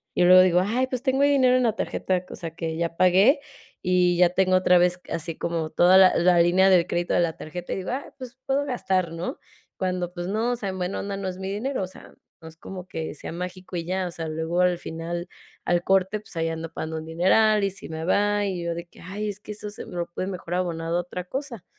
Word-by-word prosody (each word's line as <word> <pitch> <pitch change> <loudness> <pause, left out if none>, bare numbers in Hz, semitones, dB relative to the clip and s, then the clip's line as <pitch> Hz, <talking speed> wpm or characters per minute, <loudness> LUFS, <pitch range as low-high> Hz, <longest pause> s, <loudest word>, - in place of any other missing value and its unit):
y - - +3
luego 185 +1 +9
digo: 180 -1 +4
"Ay, 250 +5 0
pues, 255 -1 -4
tengo 265 0 +1
dinero 265 -3 +4
en 255 - +2
la 230 -3 +2
tarjeta". 185 -4 -1
O - - -6
sea 165 -2 -6
que 165 -1 -3
ya 170 0 -2
pagué 190 - +5 0.4
y 180 -1 +3
ya 180 0 +5
tengo 185 +1 +2
otra 180 -1 +4
vez 180 +1 +2
así 165 0 -4
como 165 -2 -2
toda 180 +3 +6
la 190 -1 +7
la 175 0 +4
línea 180 +3 +5
de 175 -2 +4
crédito 175 0 -1
de - - +3
la 165 -2 -1
tarjeta 175 +3 -6
y - - -3
digo: 185 -1 -4
"Ay, 265 +3 -4
pues, 255 -1 -10
puedo 280 +1 +1
gastar", 190 - -1
¿no?, 165 +1 -4 0.4
cuando, 180 -2 -2
pues, 175 -1 -5
no, 220 +5 0
o - - -1
sea, 200 -4 -4
en 190 - -5
buena 180 +2 -2
onda, 200 0 -4
no 195 -1 -4
es 185 - -7
mi 190 0 -4
dinero. 235 +3 -2
O 185 - -3
sea, 185 - -15 0.3
no 160 - -10
es 160 - -17
como 185 +1 -9
que 160 -2 -5
sea - - -7
mágico 180 +1 -6
y 165 - -4
ya, 185 +1 -1
o - - -6
sea, 165 -1 -5
luego 160 +3 -1
al 180 -1 +3
final, 170 +2 -5 0.4
al 175 0 +1
corte, 190 +2 +2
pues, 210 - -15
ahí 165 - 0
ando 165 0 -5
pagando 160 0 -4
un 160 - -6
dineral 200 +6 +3
y - - +1
si 195 - -11
me 160 0 -5
va, 205 +2 +2
y 185 -3 -3
yo 170 0 -1
de 170 0 -6
que: - - -18
"Ay, 205 +4 -4
es 205 0 -6
que 210 - -9
eso 210 0 -7
se 205 - -9
lo 175 -1 -4
puede 185 +2 -4
mejor 180 -2 -4
abonar 170 -3 -2
a 170 - -1
otra 180 0 -5
cosa", 255 -2 -6
180 Hz, 255 wpm, -25 LUFS, 170-200 Hz, 0.4 s, luego